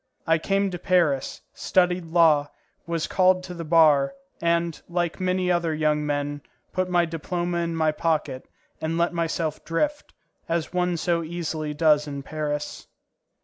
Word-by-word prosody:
I 165 -1 +3
came 195 +3 0
to 175 - -5
Paris, 170 -7 +1
studied 180 -1 +1
law, 160 -3 +4 0.4
was 165 -2 -1
called 185 0 +3
to 180 - -7
the 170 -1 -6
bar, 155 -3 +4 0.3
and, 170 -1 0
like 175 0 -1
many 185 0 +1
other 170 -2 +1
young 150 -1 +1
men, 145 0 -2 0.3
put 185 0 -1
my 175 -1 +3
diploma 175 +2 -3
in 170 -1 -2
my 160 -1 +2
pocket, 150 -4 -1 0.3
and 160 +1 -1
let 170 +1 +1
myself 165 -2 -2
drift, 290 - -2 0.4
as 165 0 -1
one 180 -1 +1
so 170 +1 0
easily 160 -2 -4
does 150 -1 +3
in 140 -1 -5
Paris. 150 0 -4
165 Hz, 150 wpm, -25 LUFS, 155-175 Hz, 0.4 s, law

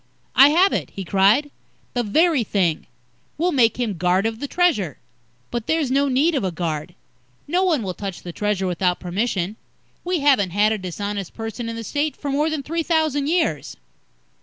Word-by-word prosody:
"I 275 +2 +8
have 360 +6 +4
it," - - -2
he 195 - -4
cried. 200 - +3 0.4
"The 245 - 0
very 295 - +2
thing. 180 -7 0 0.5
We'll 350 +4 +1
make 245 -5 +3
him 215 -8 -2
guard 180 +3 +2
of 225 0 -2
the 285 - -4
Treasure." 275 - +1 0.5
"But 240 -2 -4
there's 315 -5 0
no 280 +1 +2
need 280 +6 +2
of 275 - 0
a 190 - 0
guard. 165 0 -4 0.5
No 355 +5 +1
one 320 -10 +1
will 185 -2 -3
touch 195 -1 -6
the 175 - -7
Treasure 205 -1 -1
without 180 0 0
permission. 190 +1 -2 0.5
We 355 -3 -1
haven't 265 -10 +4
had 210 +1 +4
a 220 - -1
dishonest 195 +1 -5
person 225 +1 -5
in 230 - -5
the 230 - -5
State 295 +6 -2
for 285 - -4
more 295 +3 +1
than 310 -3 -3
three 330 +4 -2
thousand 310 -4 +1
years." 310 - -1
230 Hz, 185 wpm, -22 LUFS, 195-295 Hz, 0.5 s, I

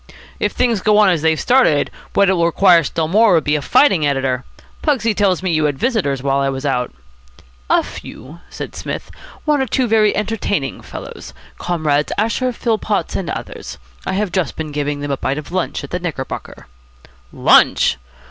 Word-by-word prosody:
"If - - 0
things 235 -5 +1
go 210 +1 +3
on 210 -2 +6
as 170 -4 +1
they've 160 0 +2
started, 245 - +3 0.2
what 200 - +4
it 190 - +4
will 170 -2 +2
require 170 -1 +5
still 160 +2 -2
more 210 +2 +4
will 160 - +3
be 150 0 0
a 150 - -1
fighting 185 - +3
editor. 135 -3 0 0.4
Pugsy 235 -8 +1
tells 195 -3 +1
me 185 - 0
you 155 -1 +2
had 145 -2 -1
visitors 145 - -1
while 140 0 +1
I 135 0 +1
was 135 +1 -4
out." 125 -3 -1 0.8
"A - - +3
few," 145 +8 -10
said - - -7
Psmith. - - -6 0.3
"One 300 -2 +2
or 265 - -1
two 255 +3 +1
very 215 -2 +3
entertaining 205 - -2
fellows. - - -9 0.2
Comrades 150 -4 0
Asher, 230 +4 0
Philpotts, 220 -4 -1
and 180 - -3
others. - - -7 0.3
I - - -3
have 200 -1 -1
just 185 -4 -1
been 155 -1 -5
giving 145 0 -2
them 145 0 -3
a 135 - -1
bite 135 +2 -2
of 150 - -7
lunch 185 -1 -2
at - - -9
the 180 - -2
Knickerbocker." 155 -7 -6 0.7
"Lunch!" - - +4
170 Hz, 185 wpm, -18 LUFS, 145-210 Hz, 0.8 s, on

